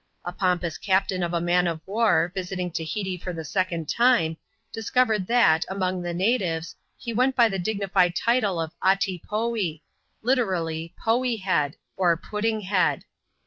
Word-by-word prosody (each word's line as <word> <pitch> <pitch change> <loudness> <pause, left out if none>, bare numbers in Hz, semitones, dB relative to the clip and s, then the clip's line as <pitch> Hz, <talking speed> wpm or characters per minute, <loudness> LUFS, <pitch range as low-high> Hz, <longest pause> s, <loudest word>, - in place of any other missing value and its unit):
A 175 - -3
pompous 180 -4 -1
captain 190 -1 +1
of 170 -1 -1
a 170 - 0
man 175 +1 +2
of 165 -2 -2
war, 210 -3 +2
visiting 180 -1 -3
Tahiti 180 +3 -3
for 180 +1 -5
the 165 -1 -5
S0cond 170 -1 -2
time, 235 -7 +3 0.4
discovered 225 -4 +1
that, 205 -10 +4
among 185 -1 -1
the 175 0 -3
native6,^he 180 +1 -2
went 255 +3 +2
by 235 -2 +6
the 195 -3 -3
dignified 190 -2 +1
title 225 -7 +1
of 160 0 -3
" - - -14
Atee 190 -2 +2
Foee" 210 -7 -1 0.2
— - - -46
literally, 175 -10 -1
Poee 240 +1 +1
Head, 170 -7 0 0.2
or 175 -3 +3
Pud 210 +5 -6
ding 220 -1 0
Head. 190 -1 +1
185 Hz, 160 wpm, -25 LUFS, 170-220 Hz, 0.4 s, by